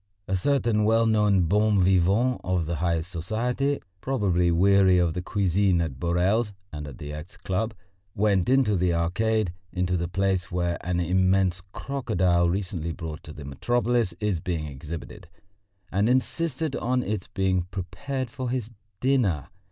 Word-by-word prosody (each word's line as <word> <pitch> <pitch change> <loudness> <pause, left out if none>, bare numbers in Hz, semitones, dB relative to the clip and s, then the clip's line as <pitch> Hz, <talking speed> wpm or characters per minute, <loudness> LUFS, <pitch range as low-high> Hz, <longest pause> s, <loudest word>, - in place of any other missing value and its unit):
A 95 - 0
certain 115 0 +1
well 115 +2 +3
known 105 -3 +3
bon 105 +3 +3
vivant 95 +7 +3
of 90 -3 0
the 85 0 -2
highest 85 +1 -1
society, 120 - -1 0.2
probably 95 -10 +1
weary 95 +2 +5
of 85 -2 +2
the 90 - -3
cuisine 95 -1 +1
at 75 -6 -3
Borel's 95 +6 +1 0.2
and 75 -1 -5
at 70 - -9
the 75 0 -7
X. 75 +7 -9
Club, 110 +4 -2 0.4
went 100 -2 +2
into 130 -6 +3
the 90 -1 +1
Arcade, 95 +3 0 0.2
into 90 0 0
the 85 0 -2
place 95 -1 0
where 85 -1 -1
an 90 0 -1
immense 95 +1 +2
crocodile 90 -12 +1
recently 90 -3 -2
brought 80 -2 -6
to 75 - -10
the 75 -2 -9
metropolis 120 - 0
is 105 -5 0
being 80 -2 -3
exhibited, 75 +3 -8 0.6
and 100 +4 +2
insisted 145 +3 0
on 125 +1 0
its 105 -2 -3
being 95 -2 0
prepared 120 - -4
for 130 0 -4
his 120 -3 -3 0.3
dinner. 120 - +1
95 Hz, 150 wpm, -26 LUFS, 85-110 Hz, 0.6 s, weary